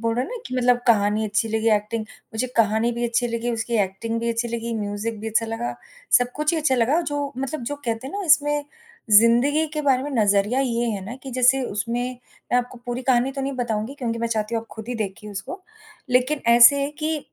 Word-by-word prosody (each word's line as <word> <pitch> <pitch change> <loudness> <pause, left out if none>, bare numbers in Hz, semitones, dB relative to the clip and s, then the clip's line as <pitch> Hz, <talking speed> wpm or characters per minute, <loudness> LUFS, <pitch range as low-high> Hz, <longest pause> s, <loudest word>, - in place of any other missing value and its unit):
बोल 230 0 0
रहे 250 +2 0
हो - - -9
ना - - -4
कि - - -6
मतलब 245 -1 +3
कहानी 210 -1 +3
अच्छी 210 +2 0
लगी 220 +1 0
एक्टिंग 215 +2 -3 0.3
मुझे 235 +3 -1
कहानी 220 +1 +3
भी 240 +1 -3
अच्छी 235 +1 0
लगी, 235 +1 -2
उसकी 230 0 -3
एक्टिंग 210 +4 -3
भी 235 - -1
अच्छी 230 +1 -2
लगी, 235 0 -3
म्यूज़िक 205 +2 -4
भी 225 - -4
अच्छा 225 +1 +1
लगा। 225 - -3 0.4
सब 245 0 -2
कुछ 300 +2 +1
ही 330 - +1
अच्छा 295 -4 +2
लगा 255 +7 +2
जो 290 -3 -3
मतलब 270 +1 -4
जो 290 +5 -3
कहते 230 +1 -3
हैं 270 - -8
ना, 405 - -3
इसमें 295 -1 +3 0.5
ज़िंदगी 240 +9 +5
के 300 - -2
बारे 265 -3 +2
में 290 - -4
नज़रिया 205 +4 +2
ये 240 -3 0
है 200 -3 -4
ना 225 +5 -6
कि 270 - -7
जैसे 255 +2 +3
उसमें 230 +3 -2 0.5
मैं - - +5
आपको 245 0 -5
पूरी 245 +1 -3
कहानी 255 +1 +2
तो 275 - -5
नहीं 270 +1 -2
बताऊँगी 235 0 -2
क्योंकि 235 -5 -3
मैं 235 - -1
चाहती 220 0 -2
हूँ 225 - 0
आप - - -18
खुद 220 +1 -9
ही 245 - -3
देखिए 210 -1 -5
उसको। 205 - -7 0.5
लेकिन 255 +4 +2
ऐसे 240 +4 +8
है 280 - -2
कि 310 0 0
235 Hz, 230 wpm, -23 LUFS, 225-265 Hz, 0.5 s, ऐसे